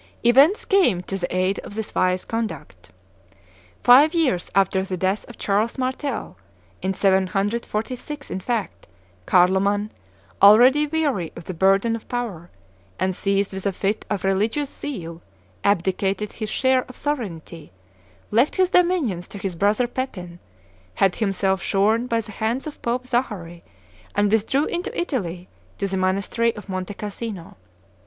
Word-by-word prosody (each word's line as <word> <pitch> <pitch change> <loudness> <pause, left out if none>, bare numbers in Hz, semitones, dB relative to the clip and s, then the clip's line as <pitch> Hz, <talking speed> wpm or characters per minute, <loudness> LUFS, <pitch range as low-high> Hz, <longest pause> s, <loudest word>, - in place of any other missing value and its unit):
Events 275 - +5
came 295 - +3
to 195 - -5
the 180 -1 -3
aid 185 +2 +1
of 205 - -9
this 220 -1 -5
wise 185 0 +1
conduct. 190 - -5 0.9
Five 285 +7 +7
years 260 - +1
after 195 -1 +3
the 190 -1 -4
death 190 +5 -1
of 240 - -12
Charles 210 +5 0
Martel, 260 - -3 0.4
in 190 0 -1
746 210 +9 -1
in 190 - -2
fact, 225 +2 -3 0.4
Carloman, 195 +3 +3 0.5
already 250 +9 +7
weary 285 - -1
of 170 - -9
the 185 - -6
burden 195 +6 +3
of 230 - -10
power, 215 -9 -4 0.5
and 185 -1 -1
seized 200 +1 0
with 190 +1 -3
a - - +1
fit 195 +3 -2
of 205 -3 -2
religious 215 +9 0
zeal, 170 - -6 0.4
abdicated 195 +1 0
his 215 -2 -5
share 260 +1 +2
of 255 - -13
sovereignty, 170 - -5 0.6
left 240 +7 +3
his 370 -1 +2
dominions 320 - +2
to - - -9
his 195 -2 -3
brother 205 +7 +2
Pepin, 190 -9 -5 0.6
had 195 -2 +2
himself 195 -2 0
shorn 215 +5 +1
by 230 -1 +1
the 215 -1 -11
hands 225 +5 -2
of 310 - -8
Pope 245 +2 -2
Zachary, 205 -10 -3 0.5
and 205 0 +2
withdrew 225 +7 +2
into 355 +5 -3
Italy 185 - -3 0.3
to 200 - -2
the 195 - -3
monastery 200 +5 0
of 210 -2 -10
Monte 185 +1 -4
Cassino. 205 -3 -6
205 Hz, 145 wpm, -23 LUFS, 190-245 Hz, 0.9 s, Five